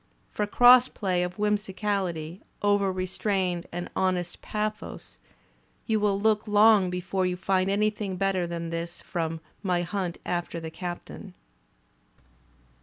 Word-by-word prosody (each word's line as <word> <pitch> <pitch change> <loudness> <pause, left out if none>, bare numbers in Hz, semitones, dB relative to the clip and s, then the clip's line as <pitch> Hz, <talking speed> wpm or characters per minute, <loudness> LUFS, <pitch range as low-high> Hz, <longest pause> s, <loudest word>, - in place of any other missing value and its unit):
For 210 - -1
cross 245 +3 +7
play 185 -4 -1
of 180 0 -2
whimsicality 195 -5 -1 0.2
over 205 -1 +3
restrained 185 -1 -1
and 175 +1 -4
honest 180 -2 -1
pathos, 215 0 -5 0.7
you 220 -2 +1
will 205 -1 +1
look 215 +1 +2
long 210 -2 +5
l)efore 180 +1 -1
you 180 - -3
find 190 0 +1
anything 210 -1 0
better 190 -2 0
than 170 -1 -4
this 170 +1 -4
from 165 -1 -3 0.2
"My 180 -3 0
Hunt 180 -1 -3
After 175 -1 -2
the 160 -1 -7
Captain." 175 +1 -7
190 Hz, 125 wpm, -27 LUFS, 175-210 Hz, 0.7 s, cross